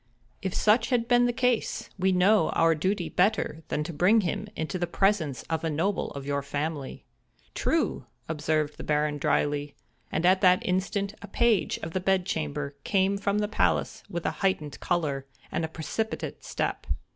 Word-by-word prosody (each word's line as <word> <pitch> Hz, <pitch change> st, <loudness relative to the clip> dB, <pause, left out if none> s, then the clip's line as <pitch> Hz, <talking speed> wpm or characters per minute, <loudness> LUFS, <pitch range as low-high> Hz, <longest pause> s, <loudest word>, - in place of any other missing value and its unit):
If 190 Hz, -2 st, -3 dB
such 220 Hz, +2 st, +3 dB
had 240 Hz, -3 st, +1 dB
been 245 Hz, 0 st, +5 dB
the -, -, +2 dB
case, 250 Hz, -1 st, 0 dB
we 190 Hz, +1 st, +3 dB
know 185 Hz, 0 st, +4 dB
our 165 Hz, 0 st, +4 dB
duty 180 Hz, +3 st, -1 dB
better 180 Hz, -4 st, +1 dB
than 150 Hz, -, -1 dB
to 170 Hz, +2 st, -6 dB
bring 190 Hz, +9 st, +4 dB
him 200 Hz, +3 st, -2 dB
into 160 Hz, +3 st, -3 dB
the 175 Hz, -, 0 dB
presence 170 Hz, -7 st, +1 dB
of 160 Hz, -1 st, -3 dB
a 165 Hz, -, 0 dB
noble 170 Hz, +6 st, 0 dB
of 140 Hz, -1 st, -7 dB
your 140 Hz, 0 st, -1 dB
family." 145 Hz, 0 st, -4 dB, 0.5 s
"True!" -, -, 0 dB, 0.2 s
observed 155 Hz, -1 st, -1 dB
the -, -, -7 dB
Baron, 150 Hz, 0 st, 0 dB
dryly, 145 Hz, +1 st, 0 dB, 0.4 s
and 170 Hz, -, 0 dB
at 185 Hz, +1 st, +5 dB
that 185 Hz, -1 st, +5 dB
instant 195 Hz, +2 st, -1 dB
a 205 Hz, -, -8 dB
page 225 Hz, -2 st, +2 dB
of 165 Hz, -, -5 dB
the 185 Hz, -, 0 dB
bedchamber 155 Hz, -7 st, -1 dB
came 195 Hz, 0 st, +2 dB
from 200 Hz, 0 st, 0 dB
the 210 Hz, 0 st, +1 dB
palace 215 Hz, -, 0 dB
with 170 Hz, -3 st, -4 dB
a -, -, +2 dB
heightened 155 Hz, -7 st, 0 dB
color, 145 Hz, -6 st, -1 dB, 0.2 s
and 170 Hz, -, -1 dB
a -, -, 0 dB
precipitate 160 Hz, +8 st, -4 dB
step. -, -, -3 dB
175 Hz, 175 wpm, -27 LUFS, 150-200 Hz, 0.5 s, been